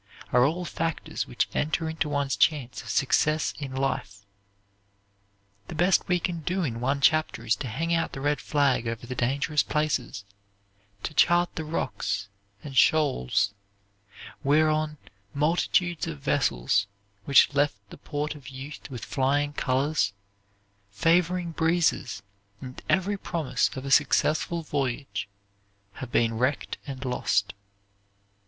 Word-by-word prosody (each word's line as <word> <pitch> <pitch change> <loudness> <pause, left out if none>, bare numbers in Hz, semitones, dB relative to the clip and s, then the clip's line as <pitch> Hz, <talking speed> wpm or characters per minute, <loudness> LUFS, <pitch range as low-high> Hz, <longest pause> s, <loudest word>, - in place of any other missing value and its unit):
are 125 0 +5
all 175 +5 -1
factors 165 -1 -3
which - - 0
enter 155 +2 0
into 160 -1 -2
one's 140 -2 0
chance 140 -6 +1
of 120 - -11
success 155 +4 +2
in 135 -3 -5
life. 100 -7 -2 1.4
The - - -7
best 175 +4 +3
we 180 -1 +2
can 175 -1 -2
do 180 +4 -1
in 115 -7 -2
one 135 +3 0
chapter 155 -6 +2
is 110 -2 +3
to 130 - -5
hang 165 +9 -1
out 165 -1 0
the - - -5
red 145 +2 0
flag 140 -5 +1
over 115 +1 -4
the 130 - -5
dangerous 140 +5 +1
places; 135 -9 -1 0.8
to - - -4
chart 175 +3 +4
the 160 - -4
rocks 105 -9 -3 0.3
and 140 -2 -8
shoals, 100 - +3 0.9
whereon 155 +1 +2 0.4
multitudes 170 +3 +1
of 155 -3 -5
vessels, 100 - +1 0.4
which 140 +1 +6
left 145 -6 +2
the - - -10
port 150 +1 -3
of 145 -4 -13
youth 135 +3 -9
with 125 -5 -7
flying 145 +2 0
colors, 135 -6 +1 0.8
favoring 170 - +2
breezes 160 - +1 0.4
and 130 +1 -9
every 195 +2 +2
promise 150 -10 0
of 130 0 -6
a 135 - -4
successful 155 +4 +2
voyage, 130 -8 -3 0.7
have 125 -2 -6
been 115 -1 +2
wrecked 130 +3 -1
and 135 -1 -6
lost. 110 -6 0
145 Hz, 135 wpm, -27 LUFS, 125-160 Hz, 1.4 s, which